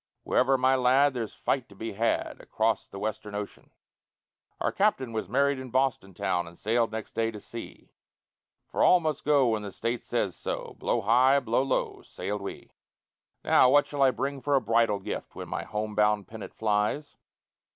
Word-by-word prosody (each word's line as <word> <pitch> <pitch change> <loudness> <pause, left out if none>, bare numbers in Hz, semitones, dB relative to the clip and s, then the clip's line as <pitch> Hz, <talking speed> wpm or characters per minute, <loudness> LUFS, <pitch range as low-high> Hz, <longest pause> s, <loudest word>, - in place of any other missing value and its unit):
Wherever, 135 0 +3
my 130 +1 +3
lad, 130 +2 +4
there's 115 -4 -4
fight 130 -3 -1
to 100 - -15
be 110 +2 -5
had 115 +4 -1
Acrost 110 -1 -1
the - - -8
Western 105 0 -4
ocean. 105 0 -7 0.9
Our - - 0
captain 135 - +1
was 110 - -3
married 140 +3 +2
in 130 -1 -7
Boston 125 -7 0
town 90 -2 -1
And 85 0 -13
sailed 115 +1 +1
next 110 -1 -6
day 115 0 0
to 110 -2 -8
sea; 115 +2 -10 0.7
For - - -1
all 180 - +6
must 155 -4 -2
go 140 -4 +4
when 110 -2 0
the 100 -1 -6
State 115 +3 -3
says - - -2
so; - - -5
Blow - - 0
high, 130 +6 +4
blow 120 -1 +1
low, 135 -1 -1
sailed 105 0 -5
we. 100 - -8 0.7
"Now, 125 - +5
what 145 +2 +5
shall 145 -1 -4
I 135 - +6
bring 135 +1 -3
for 145 +2 +1
a - - +5
bridal 115 -2 +2
gift 100 - -6
When - - -7
my - - -4
home 105 +1 -4
bound 105 -2 +2
pennant 110 -1 -9
flies? 110 +7 -1
115 Hz, 185 wpm, -28 LUFS, 105-135 Hz, 0.9 s, all